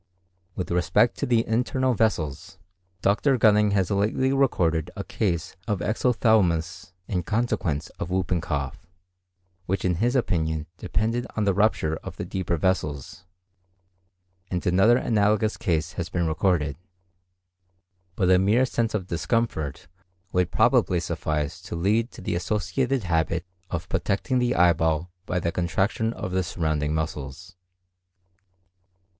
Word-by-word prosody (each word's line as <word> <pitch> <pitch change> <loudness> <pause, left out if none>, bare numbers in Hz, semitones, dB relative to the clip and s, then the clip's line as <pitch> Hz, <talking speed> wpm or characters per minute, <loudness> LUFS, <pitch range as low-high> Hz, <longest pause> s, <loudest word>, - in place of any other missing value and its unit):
With 90 - -4
respect 90 0 +3
to - - -1
the 115 -2 +2
internal 125 +3 +1
vessels, 85 - -1 0.5
Dr. 125 +7 +3
Gunning 105 -2 +4
has 95 -1 +1
lately 110 +7 +1
recorded 85 - +1
a - - -4
case 85 -4 -2
of 105 - 0
exophthalmos 100 -5 +1
in 90 -3 -1
consequence 95 -7 -1
of - - -4
whooping 90 -2 0
cough, 75 +2 -4 0.8
which 95 +1 -1
in 90 -2 +1
his 120 +3 +2
opinion 80 - 0
depended 115 +3 -1
on 110 - 0
the 100 -1 +2
rupture 90 -6 +1
of - - -9
the - - -4
deeper 90 -3 -2
vessels; 80 -2 -2 1.2
and 90 -1 -3
another 95 +7 +5
analogous 105 -2 +2
case 85 -1 -1
has 85 -2 -4
been 85 -1 -1
recorded. 80 -2 0 1.4
But 95 -1 +2
a 90 - +6
mere 105 +7 +3
sense 115 -3 -1
of 95 -4 -2
discomfort 85 - -2 0.4
would 90 -1 +1
probably - - +3
suffice 75 -2 -3
to - - -7
lead 105 +7 +1
to - - -10
the - - -2
associated 110 +8 -1
habit 85 0 0 0.2
of 85 0 -4
protecting 125 +6 0
the 125 0 +1
eyeball 85 -1 +2 0.2
by 90 - 0
the 85 -1 -1
contraction 95 +6 0
of 90 - -5
the 95 0 +1
surrounding 80 -3 -1
muscles. 80 +3 -5
95 Hz, 135 wpm, -25 LUFS, 80-110 Hz, 1.4 s, a